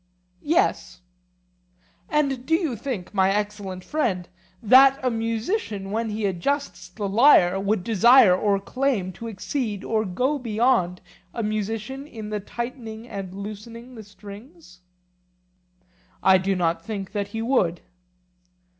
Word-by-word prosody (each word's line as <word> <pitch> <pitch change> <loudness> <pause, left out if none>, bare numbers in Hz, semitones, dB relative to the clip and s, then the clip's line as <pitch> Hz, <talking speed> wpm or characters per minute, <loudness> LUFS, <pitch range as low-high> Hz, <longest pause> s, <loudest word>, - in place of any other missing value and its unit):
Yes. 335 - 0 1.1
And 275 -4 0
do 320 +5 +2
you 325 -8 -1
think, 220 -5 -5
my 190 -1 +3
excellent 205 -2 -3
friend, 210 - -1 0.4
that 265 +4 +7
a 255 - +2
musician 225 - -2
when 225 +1 -1
he 210 0 -2
adjusts 195 +1 -2
the 200 +3 -4
lyre 195 -4 +5
would 200 -1 0
desire 230 -1 +6
or 200 +1 +1
claim 235 -3 -1
to 230 - -8
exceed 215 0 -4
or 220 -1 0
go 250 +10 -1
beyond 225 -6 +1 0.3
a 230 - -2
musician 215 +6 -3
in 215 -5 -8
the 210 - -1
tightening 235 +1 -7
and 195 -4 -7
loosening 215 +5 -8
the 225 - -9
strings? 205 - -13 1.4
I 190 -1 +6
do 195 +1 0
not 170 -2 0
think 200 -4 -5
that 205 -1 -2
he 225 +2 -5
would. 195 -9 +1
215 Hz, 130 wpm, -24 LUFS, 195-250 Hz, 1.4 s, that